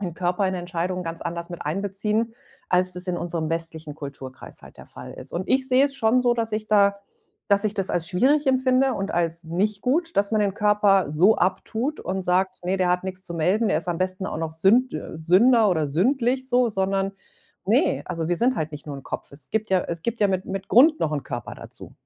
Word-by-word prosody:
den 175 -4 -4
Körper 180 +3 0
in 185 - -1
der 180 - -3
Entscheidung 175 +1 -3
ganz 165 -1 -6
anders 170 0 -4
miteinbeziehen, 200 +7 -2 0.4
als 185 0 +2
das 180 +1 -3
in 180 -1 -1
unserem 165 -2 -3
westlichen 165 -2 -3
Kulturkreis 140 -3 -9
halt - - -15
der - - -11
Fall - - -10
ist. - - -9
Und 180 +3 -3
ich 265 0 +2
sehe 260 +1 +5
es 275 - -1
schon 250 -1 +2
so, 245 - +3
dass 225 -2 -2
ich 215 0 -2
da 200 -1 +4 0.5
dass 200 +1 +3
ich 215 0 0
das 195 -2 -2
als 165 -2 -1
schwierig 270 +11 +2
empfinde 260 0 +3
und 195 -1 -3
als 170 0 -1
nicht 195 +5 -1
gut, 330 +6 0
dass 200 0 +2
man 215 - +2
den 200 -2 0
Körper 205 -5 +3
so 180 +8 +4
abtut 220 - -1
und 190 0 -3
sagt: 185 0 0
„Ne, 185 +2 0
der 185 -1 +2
hat 180 0 +1
nix 185 0 -3
zu 170 - -5
melden.“, 185 +8 +1
der - - +2
ist - - -7
am 170 -1 -1
besten 185 +1 -2
auch - - -4
noch 160 -1 -3
sünd 215 +10 +3
äh, - - -6
Sünder 210 +8 +4
oder 160 -4 +1
sündlich 255 - +1
so, 245 -1 +3
sondern 195 0 0 0.6
ne, - - +2
also, 165 -1 -3
wir 175 - +1
sind 250 +3 +2
halt 155 0 -2
nicht 150 +1 -9
nur 145 - -5
'n 135 - -10
Kopf. - - -6
Es 140 -1 -9
gibt 220 0 -1
ja 190 -1 +4
es 170 -1 -6
gibt 230 +3 -3
ja 205 - +4
mit 190 0 -1
mit 195 0 -5
Grund 305 +6 +5
noch 155 - +1
'n 145 - -2
Körper - - -6
dazu. - - -8
190 Hz, 235 wpm, -24 LUFS, 170-220 Hz, 0.6 s, sehe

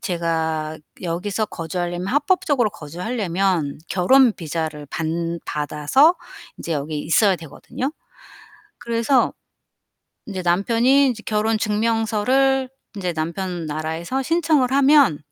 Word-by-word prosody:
제가 160 -3 -2 0.2
여기서 185 +5 -2
거주하려면, 175 +1 -4
합법적으로 285 - +1
거주하려면 180 - -2
결혼 245 +7 +5
비자를 160 -4 -4
반 165 +2 -2
받아서 150 - +2 0.4
이제 170 - -4
여기 150 +1 -3
있어야 190 +5 +3
되거든요. 170 - -6 0.9
그래서 235 +3 +1 1.0
이제 190 -4 -5
남편이 235 +10 +3
이제 220 -2 -6
결혼 215 +1 +1
증명서를 230 +5 +1 0.3
인제 180 -4 -3
남편 170 +1 -3
나라에서 160 - -3
신청을 315 -4 +2
하면 275 - +5
190 Hz, 270 characters per minute, -21 LUFS, 165-250 Hz, 1.0 s, 결혼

